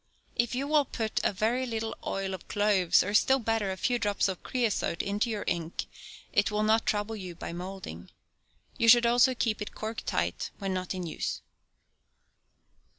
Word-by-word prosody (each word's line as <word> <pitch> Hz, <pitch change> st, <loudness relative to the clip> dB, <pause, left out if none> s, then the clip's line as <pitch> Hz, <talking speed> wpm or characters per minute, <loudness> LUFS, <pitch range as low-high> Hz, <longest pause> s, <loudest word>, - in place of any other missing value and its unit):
If 240 Hz, +1 st, +1 dB
you 275 Hz, +3 st, -1 dB
will 300 Hz, -1 st, +4 dB
put 220 Hz, -3 st, -2 dB
a -, -, +3 dB
very 230 Hz, +6 st, 0 dB
little 225 Hz, -1 st, -3 dB
oil 195 Hz, 0 st, -2 dB
of 185 Hz, -, -8 dB
cloves, 205 Hz, -4 st, +3 dB
or 200 Hz, -, -3 dB
still 265 Hz, +5 st, +5 dB
better, 225 Hz, -4 st, 0 dB
a 190 Hz, -, -4 dB
few 245 Hz, +4 st, +1 dB
drops 205 Hz, -2 st, +1 dB
of 190 Hz, -2 st, -4 dB
creosote, 225 Hz, -9 st, -1 dB
into 205 Hz, +4 st, 0 dB
your 215 Hz, -2 st, -2 dB
ink, 170 Hz, -2 st, -2 dB, 0.5 s
it -, -, +3 dB
will 210 Hz, 0 st, 0 dB
not 220 Hz, +1 st, +3 dB
trouble 210 Hz, +1 st, 0 dB
you 185 Hz, -4 st, -7 dB
by 170 Hz, -, -6 dB
moulding. 175 Hz, -, -7 dB, 0.7 s
You 230 Hz, -, +3 dB
should 240 Hz, +1 st, +8 dB
also 245 Hz, +2 st, +4 dB
keep 225 Hz, -3 st, 0 dB
it 210 Hz, -, -6 dB
corked 220 Hz, +1 st, -5 dB
tight 85 Hz, +1 st, -1 dB
when 195 Hz, -2 st, -2 dB
not 185 Hz, 0 st, -3 dB
in 180 Hz, -1 st, -4 dB
use. 160 Hz, -, -3 dB
210 Hz, 180 wpm, -29 LUFS, 190-230 Hz, 0.7 s, should